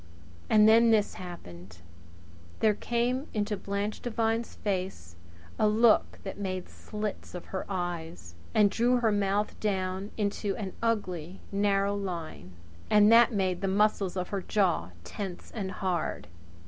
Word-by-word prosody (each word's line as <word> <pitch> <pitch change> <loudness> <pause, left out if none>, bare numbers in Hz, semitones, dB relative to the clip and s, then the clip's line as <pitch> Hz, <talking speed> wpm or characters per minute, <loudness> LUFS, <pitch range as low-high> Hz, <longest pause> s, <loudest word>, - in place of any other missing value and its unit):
And 215 -1 +6
then 230 +1 +6
this 215 -2 +3
happened! 90 - -10 0.8
There 215 -1 +4
came 240 +6 -1
into 210 0 0
Blanche 200 +2 -3
Devine's 230 -1 -1
face 185 - -3 0.4
a 215 - +4
look 220 +1 +4
that 195 0 -6
made 185 -2 -4
slits 210 -3 -6
of 180 - -7
her 190 - -3
eyes, 170 - -4 0.2
and 210 -2 +5
drew 240 +4 +2
her 225 -2 +3
mouth 205 0 0
down 190 -1 -2
into 205 -1 -1
an 195 -4 -5
ugly, 185 -6 -2
narrow 200 0 +2
line, 170 - -5 0.4
and 210 0 +6
that 235 +1 +7
made 190 -4 0
the 195 - 0
muscles 195 -1 +1
of 180 -1 -2
her 200 -1 -2
jaw 180 - +1
tense 180 - -7
and 200 -5 -4
hard. 185 -5 -2
200 Hz, 140 wpm, -29 LUFS, 185-215 Hz, 0.8 s, that